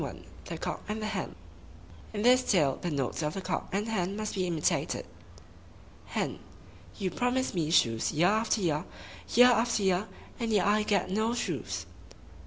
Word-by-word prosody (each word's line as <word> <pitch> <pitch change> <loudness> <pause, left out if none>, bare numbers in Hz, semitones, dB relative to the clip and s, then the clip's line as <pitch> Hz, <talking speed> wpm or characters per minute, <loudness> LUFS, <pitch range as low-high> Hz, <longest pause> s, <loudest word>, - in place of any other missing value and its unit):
THE - - -5
COCK - - -4
AND 215 +1 -3
HEN 205 - -3 0.8
(In 205 -1 -3
this 250 +2 +6
tale 150 -9 +2
the 175 - -2
notes 140 -1 -2
of 150 0 -2
the 195 - -3
Cock - - -3
and 205 +3 -1
Hen 200 -3 -1
must 215 0 -3
be 185 -2 -1
imitated.) 165 -3 0 1.0
Hen - - -2 0.6
—You 185 -2 -2
promise 250 +1 0
me 165 -4 0
shoes 115 -8 +3
year 160 +3 +2
after 220 +1 +1
year, 160 -2 0 0.5
year 245 +2 +8
after 235 -3 +2
year, 190 +2 +2 0.3
and 230 -2 -1
yet 205 -4 +3
I 210 +1 +3
get 200 -3 0
no 220 +4 +1
shoes! 240 - -3
200 Hz, 165 wpm, -29 LUFS, 175-220 Hz, 1.0 s, year